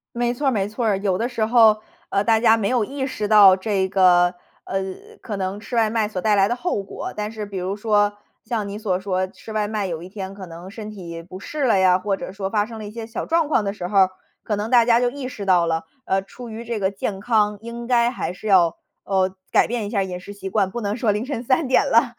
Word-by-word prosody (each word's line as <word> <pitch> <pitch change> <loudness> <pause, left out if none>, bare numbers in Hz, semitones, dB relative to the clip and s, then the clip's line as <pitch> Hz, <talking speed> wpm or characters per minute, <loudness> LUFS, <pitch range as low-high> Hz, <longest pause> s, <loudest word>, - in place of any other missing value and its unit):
没 240 0 0
错 275 +3 -2
儿 - - +4
没 200 -5 0
错 230 +3 -3
儿。 205 -3 +2
有 195 -2 0
的 230 - 0
时 235 -3 -1
候， 220 -2 +5 0.3
呃， 200 +1 +1
大 225 0 +3
家 225 -1 +5
没 215 -3 -1
有 245 -4 +2
意 270 +3 -4
识 215 -6 -3
到 205 -3 +8
这 190 -1 0
个， 180 -2 +4 0.3
呃， 195 - -2 0.4
可 210 - -5
能 195 +1 -3
吃 240 - -7
外 225 -2 +3
卖 220 -1 0
所 190 -4 -4
带 215 +1 +3
来 195 -1 +4
的 240 - -1
后 255 - -2
果， 195 - -7
但 210 0 -3
是 215 -1 -6
比 200 -1 -7
如 185 +2 -2
说 205 -1 +2 0.3
像 220 -3 -2
你 200 - -5
所 205 -4 -1
说， 185 -1 -1
吃 220 - -12
外 215 -1 0
卖 210 -1 -2
有 165 -2 -4
一 175 - -8
天 190 0 -7
可 195 -1 -9
能 170 +2 -10
身 215 -1 -7
体 170 -5 -8
不 180 +2 -10
适 285 +8 -3
了 225 -5 +4
呀 185 -1 +4
或 200 +1 -1
者 190 - -7
说 195 0 -4
发 210 -1 +1
生 225 0 -9
了 215 - -7
一 - - -8
些 230 0 -6
小 225 - -5
状 325 -2 +1
况 220 - +2
的 200 - -1
时 180 - -6
候 205 - 0
儿， 190 -1 +6 0.3
可 210 - -1
能 210 +2 -3
大 240 -2 +6
家 235 0 +4
就 245 - +2
意 280 -2 -6
识 215 -6 -7
到 180 -3 +4
了， 165 0 0 0.2
啊， 190 0 +1
出 230 +5 -11
于 225 +1 -7
这 235 -1 -3
个 190 -1 +1
健 195 0 -4
康 210 -1 +1
应 235 +1 -7
该 240 -1 +3
还 245 - -3
是 185 +4 -8
要， 180 -5 +4 0.3
哦， 190 -1 0 0.2
改 - - +4
变 235 -2 -2
一 - - -4
下 205 -2 0
饮 185 -2 -3
食 180 +3 -10
习 200 -1 -7
惯， 195 -2 +1
不 240 - -4
能 205 -2 -2
说 230 -3 +1
凌 210 +4 -2
晨 260 -4 -4
3 260 +4 +1
点 260 - +4
了 240 -2 +2
210 Hz, 290 characters per minute, -22 LUFS, 195-230 Hz, 0.4 s, 到